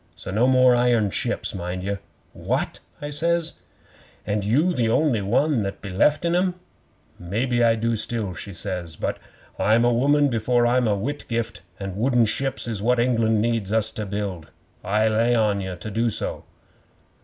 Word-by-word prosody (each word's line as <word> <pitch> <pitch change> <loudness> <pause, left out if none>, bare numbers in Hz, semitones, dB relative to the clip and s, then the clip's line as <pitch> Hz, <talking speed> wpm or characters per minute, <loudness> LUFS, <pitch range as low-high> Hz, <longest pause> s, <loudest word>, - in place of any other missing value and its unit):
So - - -7
no 110 +6 +3
more 130 -1 +5
iron 120 -4 +2
ships, - - -1
mind 90 0 -4
ye." 100 +1 -2 0.4
'"What?" - - -2 0.2
I 145 - -4
says. 170 +2 0 0.7
"And 105 0 -1
you 145 - +2
the 120 -7 +1
only 125 -3 +2
one 125 +6 +1
that 100 -1 -4
beleft 105 - +1
in 170 0 +2
'em!" 180 0 +1 0.6
'"Maybe 120 +7 0
I 115 -1 +4
do 115 +1 0
still," 110 -3 -2
she 100 - -7
says, 90 -3 -4
"but - - -3 0.4
I'm 115 +3 +3
a 120 - +3
woman 145 +4 +3
before 120 +1 +1
I'm 120 0 +2
a 105 - +2
Whitgift, 115 -2 -3 0.2
and 95 -2 -5
wooden 120 +2 +3
ships 135 +3 -1
is 110 -4 -3
what 125 +3 +2
England 115 -3 +2
needs 115 -4 -1
us 110 0 +1
to 110 -2 -5
build. 100 -5 -4 0.3
I 105 +3 +2
lay 115 +2 +2
on 105 -3 +2
ye 95 -1 -4
to 90 +5 -7
do 115 +3 +1
so." - - -4
115 Hz, 175 wpm, -23 LUFS, 100-125 Hz, 0.7 s, more